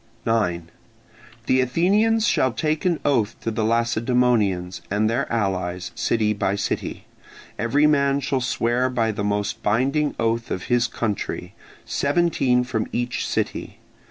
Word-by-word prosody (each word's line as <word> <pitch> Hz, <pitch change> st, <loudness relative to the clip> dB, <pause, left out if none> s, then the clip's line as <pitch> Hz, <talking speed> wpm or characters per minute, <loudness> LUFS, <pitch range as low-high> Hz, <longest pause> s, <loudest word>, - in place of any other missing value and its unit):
9. 90 Hz, -7 st, 0 dB, 0.7 s
The 130 Hz, 0 st, +3 dB
Athenians 205 Hz, -, +2 dB
shall 130 Hz, -, +2 dB
take 155 Hz, +5 st, -1 dB
an 175 Hz, -3 st, +2 dB
oath 115 Hz, -7 st, +1 dB
to 115 Hz, -, -2 dB
the 110 Hz, 0 st, -1 dB
Lacedaemonians 115 Hz, -5 st, +1 dB
and 105 Hz, +2 st, +1 dB
their 120 Hz, +5 st, -1 dB
allies, 95 Hz, -5 st, -2 dB
city 110 Hz, -2 st, +1 dB
by 100 Hz, -1 st, 0 dB
city. 100 Hz, -, -3 dB, 0.5 s
Every 130 Hz, +7 st, +2 dB
man 140 Hz, -2 st, +3 dB
shall 135 Hz, -1 st, -1 dB
swear 125 Hz, +1 st, 0 dB
by 115 Hz, -3 st, 0 dB
the 105 Hz, -1 st, -4 dB
most 105 Hz, 0 st, -1 dB
binding 135 Hz, +8 st, +1 dB
oath 115 Hz, 0 st, 0 dB
of 95 Hz, -, -3 dB
his 120 Hz, 0 st, +2 dB
country, 105 Hz, -4 st, -3 dB, 0.3 s
seventeen 140 Hz, -5 st, +1 dB
from 125 Hz, -4 st, -2 dB
each 120 Hz, 0 st, -2 dB
city. -, -, -3 dB
120 Hz, 135 wpm, -23 LUFS, 105-135 Hz, 0.7 s, The